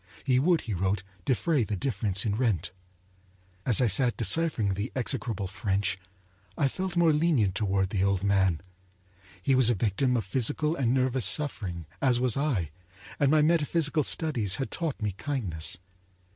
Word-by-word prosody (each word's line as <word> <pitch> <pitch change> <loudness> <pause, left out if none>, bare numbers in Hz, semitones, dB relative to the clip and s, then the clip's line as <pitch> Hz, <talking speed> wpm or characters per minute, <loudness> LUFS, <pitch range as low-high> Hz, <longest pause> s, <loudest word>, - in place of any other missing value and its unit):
He 130 -2 +2
would, 170 +3 +2
he 110 - -5
wrote, 95 +1 -1 0.2
defray 135 +1 +1
the 105 -1 -3
difference 100 -3 0
in 105 - 0
rent. 110 -10 0 1.0
As 120 - +5
I 125 - +3
sat 120 +3 +2
deciphering 115 -5 +1
the 100 +6 -4
execrable 120 -5 -2
French, 95 -1 -2 0.6
I 140 - +2
felt 185 +4 -4
more 165 -2 +4
lenient 150 - +2
toward 95 -1 0
the 95 -3 0
old 100 -1 +1
man. 95 -4 +2 0.8
He 135 - +2
was 130 -3 +5
a 120 - +2
victim 120 +6 0
of 110 - -3
physical 145 - 0
and 125 -6 0
nervous 130 -2 +1
suffering, 95 - -1 0.2
as 125 -3 +3
was 125 -3 +2
I; 125 - -1 0.5
and 140 - +3
my 155 0 +4
metaphysical 160 -1 +2
studies 125 - 0
had 135 - -4
taught 165 -5 -3
me 105 - 0
kindness. 95 - -3
120 Hz, 160 wpm, -27 LUFS, 100-140 Hz, 1.0 s, As